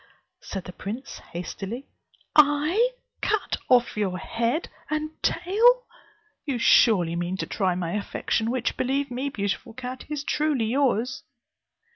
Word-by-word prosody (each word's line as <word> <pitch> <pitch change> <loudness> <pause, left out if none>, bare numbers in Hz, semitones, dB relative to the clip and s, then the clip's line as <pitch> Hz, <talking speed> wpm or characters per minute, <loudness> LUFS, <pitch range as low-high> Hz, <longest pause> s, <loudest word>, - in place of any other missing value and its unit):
said 195 -2 -5
the 180 - -9
prince 220 +9 -6
hastily, 195 - -5 0.5
"I 300 +10 +5 0.3
cut 430 -1 0
off 245 -2 +4
your 195 -4 -1
head 235 - -1 0.2
and 310 0 -1
tail! 475 +7 +4 0.6
You 275 -4 -1
surely 190 -7 +5
mean 175 +2 -2
to - - -2
try 185 -4 0
my 175 -2 -2
affection, 210 +2 -1
which, 245 0 -1
believe 270 +1 0
me, 260 +3 -2
beautiful 205 0 -3
cat, 255 0 -6
is 300 -1 -3
truly 295 -6 +1
yours." 250 0 +1
245 Hz, 130 wpm, -26 LUFS, 200-295 Hz, 0.6 s, I